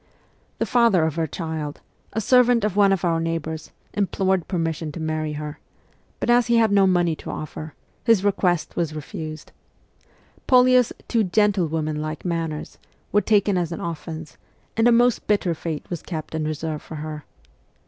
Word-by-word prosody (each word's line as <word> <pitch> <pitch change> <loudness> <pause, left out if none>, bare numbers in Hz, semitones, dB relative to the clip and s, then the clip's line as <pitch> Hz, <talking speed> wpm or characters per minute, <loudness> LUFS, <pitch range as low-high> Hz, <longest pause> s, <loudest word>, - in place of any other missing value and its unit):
The - - 0
father 230 -9 +4
of 160 - -1
her 165 0 -1
child, 160 -3 -5 0.3
a 220 - -2
servant 245 0 +4
of 210 -3 0
one 200 -1 +5
of 195 -2 +1
our 165 -1 +2
neighbours, 165 -1 -3 0.2
implored 190 -2 0
permission 165 -3 -2
to - - -6
marry 155 -1 -2
her; 150 0 -6 0.6
but - - -2
as 240 0 +4
he 235 -1 +4
had 225 -2 +4
no 200 -1 +5
money 175 -3 +2
to - - -9
offer, 155 0 -6 0.3
his 225 -5 +4
request 180 -4 +1
was 160 -3 -1
refused. 155 +1 -7 1.0
Polya's 250 -1 +5
' - - -32
too 230 -2 +2
gentlewoman 170 -7 +1
like 155 +2 -5
manners 165 -3 -3
' - - -38
were 205 - +4
taken 205 -3 +2
as 170 -1 -2
an 170 - -4
offence, 160 -2 -6 0.4
and 225 +1 +4
a - - +6
most 240 0 +3
bitter 200 -4 +2
fate 160 -2 -5
was 170 - -3
kept 160 -3 -6
in 160 -1 -1
reserve 155 0 -3
for 160 - -9
her. 155 0 -6
170 Hz, 175 wpm, -23 LUFS, 155-205 Hz, 1.0 s, a